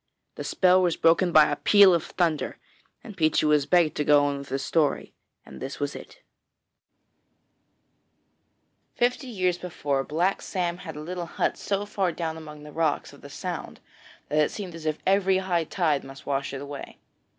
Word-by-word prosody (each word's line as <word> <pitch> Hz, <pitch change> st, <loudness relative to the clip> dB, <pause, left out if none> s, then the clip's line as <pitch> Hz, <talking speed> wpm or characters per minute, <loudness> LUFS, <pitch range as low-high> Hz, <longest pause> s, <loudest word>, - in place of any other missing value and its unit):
The -, -, -7 dB
spell 185 Hz, 0 st, +3 dB
was 175 Hz, -2 st, +1 dB
broken 170 Hz, +2 st, +3 dB
by 155 Hz, -2 st, +6 dB
a -, -, +1 dB
peal 200 Hz, +3 st, +6 dB
of 170 Hz, -, +1 dB
thunder, 165 Hz, -4 st, -1 dB, 0.5 s
and 215 Hz, -, -10 dB
Peechy 155 Hz, -4 st, +2 dB
was 150 Hz, -2 st, +3 dB
begged 175 Hz, -4 st, +3 dB
to 150 Hz, -, +1 dB
go 145 Hz, -1 st, +5 dB
on 140 Hz, -1 st, -1 dB
with 140 Hz, -, -10 dB
his 135 Hz, +1 st, -2 dB
story, 155 Hz, -3 st, 0 dB, 0.3 s
and -, -, -12 dB
this 135 Hz, +1 st, -6 dB
was 145 Hz, 0 st, -2 dB
it: -, -, -12 dB, 2.7 s
Fifty 250 Hz, +2 st, 0 dB
years 185 Hz, -6 st, -1 dB
before, 145 Hz, -6 st, -2 dB
Black 175 Hz, +7 st, 0 dB
Sam 175 Hz, -2 st, -2 dB
had 160 Hz, -4 st, -8 dB
a 150 Hz, -, -7 dB
little 175 Hz, +2 st, -5 dB
hut -, -, -1 dB
so 200 Hz, 0 st, -2 dB
far 195 Hz, -3 st, -1 dB
down 160 Hz, -1 st, -4 dB
among 150 Hz, -2 st, -10 dB
the 150 Hz, -, -10 dB
rocks 160 Hz, -1 st, -1 dB
of -, -, -16 dB
the -, -, -11 dB
Sound -, -, -6 dB, 0.5 s
that 150 Hz, -, +1 dB
it 150 Hz, -, +3 dB
seemed 190 Hz, -5 st, -7 dB
as 165 Hz, -1 st, -7 dB
if 155 Hz, 0 st, 0 dB
every 190 Hz, -1 st, +3 dB
high 180 Hz, -3 st, 0 dB
tide 155 Hz, -5 st, 0 dB
must 135 Hz, 0 st, -12 dB
wash 140 Hz, -1 st, -2 dB
it 135 Hz, 0 st, -6 dB
away. 145 Hz, 0 st, -8 dB
165 Hz, 185 wpm, -26 LUFS, 150-185 Hz, 2.7 s, by